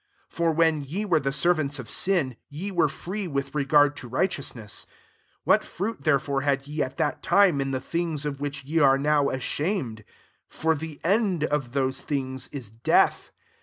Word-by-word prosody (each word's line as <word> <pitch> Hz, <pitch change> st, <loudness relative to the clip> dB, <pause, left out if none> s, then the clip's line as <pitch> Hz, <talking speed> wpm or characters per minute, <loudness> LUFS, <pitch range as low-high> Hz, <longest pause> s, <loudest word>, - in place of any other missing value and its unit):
For 170 Hz, -1 st, +1 dB
when 160 Hz, -1 st, +2 dB
ye 180 Hz, +10 st, -3 dB
were 170 Hz, -6 st, +3 dB
the 135 Hz, -, -1 dB
jnrants 150 Hz, 0 st, +1 dB
of 125 Hz, -4 st, -7 dB
sin, 165 Hz, -, +1 dB
ye 175 Hz, +8 st, -5 dB
were 175 Hz, -4 st, +3 dB
free 185 Hz, +6 st, -4 dB
tli 140 Hz, -3 st, -3 dB
regard 145 Hz, 0 st, +4 dB
to 125 Hz, -, -7 dB
righteousness. 125 Hz, -, -2 dB, 0.6 s
21 -, -, -53 dB
'lat -, -, -15 dB
fruit 205 Hz, +6 st, -4 dB
therefore 140 Hz, -2 st, +2 dB
had 140 Hz, -1 st, 0 dB
ye 150 Hz, +1 st, -3 dB
at 130 Hz, 0 st, -3 dB
It 145 Hz, -, 0 dB
time 185 Hz, -8 st, +4 dB
in 135 Hz, -, -1 dB
the 130 Hz, -1 st, -1 dB
things 165 Hz, 0 st, -2 dB
of 140 Hz, -1 st, -4 dB
which 140 Hz, -2 st, -4 dB
are 135 Hz, -2 st, +5 dB
now 145 Hz, 0 st, +2 dB
ashamed? 130 Hz, -, -2 dB, 0.5 s
for 160 Hz, 0 st, +1 dB
the 155 Hz, -1 st, -6 dB
|td 195 Hz, -3 st, +2 dB
of 145 Hz, -5 st, -1 dB
those 130 Hz, -1 st, 0 dB
things 130 Hz, -3 st, -3 dB
is 125 Hz, -7 st, -7 dB
death. 115 Hz, +1 st, +2 dB
145 Hz, 175 wpm, -26 LUFS, 135-165 Hz, 0.6 s, are